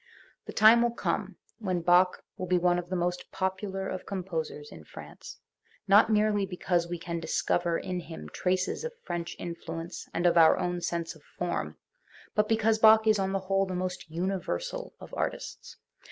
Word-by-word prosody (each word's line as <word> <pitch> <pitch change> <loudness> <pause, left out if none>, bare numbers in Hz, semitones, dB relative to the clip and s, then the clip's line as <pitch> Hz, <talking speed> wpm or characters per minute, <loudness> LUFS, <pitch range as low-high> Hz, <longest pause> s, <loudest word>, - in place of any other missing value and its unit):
The - - -5
time 225 +2 +7
will 235 0 +1
come 200 -5 -2 0.2
when 185 -5 -1
Bach 180 +2 +4
will 185 - -5
be 180 0 +3
one 175 0 +2
of 175 0 -8
the 185 - -2
most 175 0 -2
popular 190 0 -2
of 185 - -5
composers 165 -6 -4
in 80 - -11
France, - - -11 0.5
not 205 +3 +6
merely 210 -1 +3
because 180 -2 -1
we 175 - -3
can 170 0 -4
discover 170 +1 0
in 180 -1 -3
him 165 -1 -9
traces 185 - -1
of 480 0 -4
French 170 -1 -4
influence 170 0 -6
and 175 - -2
of 170 -1 +5
our 160 - +7
own 180 -1 -2
sense 170 -1 -2
of - - -18 0.2
form, - - -2 0.6
but 210 -1 +1
because 220 0 +2
Bach 220 0 +7
is 215 -2 +4
on 190 0 0
the 195 0 -1
whole 195 +1 +1
the 185 - -4
most 180 -1 -4
universal 195 - -3
of - - -12
artists. - - -4
185 Hz, 180 wpm, -29 LUFS, 175-200 Hz, 0.6 s, time